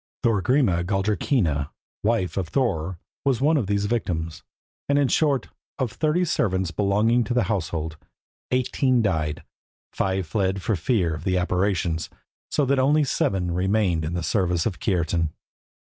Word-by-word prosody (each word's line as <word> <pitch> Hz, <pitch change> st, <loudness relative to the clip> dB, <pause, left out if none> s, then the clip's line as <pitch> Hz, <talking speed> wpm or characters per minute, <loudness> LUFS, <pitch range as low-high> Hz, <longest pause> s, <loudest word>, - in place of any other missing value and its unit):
Thorgrima 115 Hz, -4 st, +2 dB
Galldrakinna, 95 Hz, -, 0 dB, 0.3 s
wife 105 Hz, -4 st, +1 dB
of 95 Hz, -4 st, -1 dB
Thorer, 95 Hz, -, -1 dB, 0.3 s
was 135 Hz, -4 st, +2 dB
one 150 Hz, +4 st, +3 dB
of 125 Hz, -10 st, 0 dB
these 100 Hz, 0 st, 0 dB
victims, 85 Hz, -8 st, -2 dB, 0.5 s
and, 140 Hz, -, +3 dB
in 145 Hz, -1 st, +3 dB
short, 140 Hz, -1 st, +1 dB, 0.3 s
of 130 Hz, -4 st, -1 dB
thirty 160 Hz, +3 st, +1 dB
servants 95 Hz, -, 0 dB
belonging 105 Hz, +6 st, +2 dB
to 120 Hz, -, -2 dB
the 125 Hz, -, +3 dB
household, 80 Hz, -6 st, -2 dB, 0.5 s
eighteen 130 Hz, -1 st, +2 dB
died, 80 Hz, -7 st, 0 dB
and -, -, -28 dB, 0.5 s
five 95 Hz, -1 st, 0 dB
fled 95 Hz, +3 st, 0 dB
for 110 Hz, -, +1 dB
fear 90 Hz, -2 st, +1 dB
of 80 Hz, -, -6 dB
the 95 Hz, -1 st, +1 dB
apparitions, 90 Hz, -2 st, 0 dB, 0.4 s
so 145 Hz, -, +1 dB
that 135 Hz, 0 st, +2 dB
only 145 Hz, +3 st, +4 dB
seven 95 Hz, -9 st, 0 dB
remained 90 Hz, -2 st, +1 dB
in 80 Hz, +3 st, -3 dB
the 85 Hz, -, -2 dB
service 90 Hz, +1 st, +1 dB
of 90 Hz, -8 st, -2 dB
Kiartan. 85 Hz, -3 st, 0 dB
95 Hz, 150 wpm, -24 LUFS, 85-120 Hz, 0.5 s, only